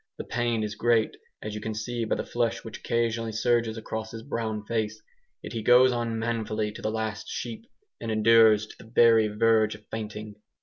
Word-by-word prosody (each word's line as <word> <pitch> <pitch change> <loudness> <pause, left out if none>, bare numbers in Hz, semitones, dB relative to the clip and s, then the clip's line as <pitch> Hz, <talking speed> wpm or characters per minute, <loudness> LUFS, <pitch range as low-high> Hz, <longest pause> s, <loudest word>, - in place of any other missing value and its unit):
The - - -5
pain 120 -2 -1
is 105 -1 -3
great, 115 0 +2 0.3
as 105 - -5
you 105 - -5
can 110 0 -4
see 115 +2 -3
by - - 0
the - - -3
flush 120 -1 -1
which 110 -2 -8
occasionally 115 -1 -1
surges 115 0 +1
across 110 0 -5
his 115 0 -8
brown 110 -2 -3
face, 110 -1 -2 0.4
yet - - -7
he 115 - -3
goes 125 +3 +6
on 120 -2 -2
manfully 110 -2 -2
to 105 - -10
the - - -1
last 110 -1 -3
sheep, 120 - -6 0.3
and 115 - -5
endures 110 -1 +5
to - - -15
the 110 - -14
very 115 -2 +5
verge 110 0 +2
of 105 +1 -16
fainting. 105 -1 -6
110 Hz, 200 wpm, -27 LUFS, 110-115 Hz, 0.4 s, goes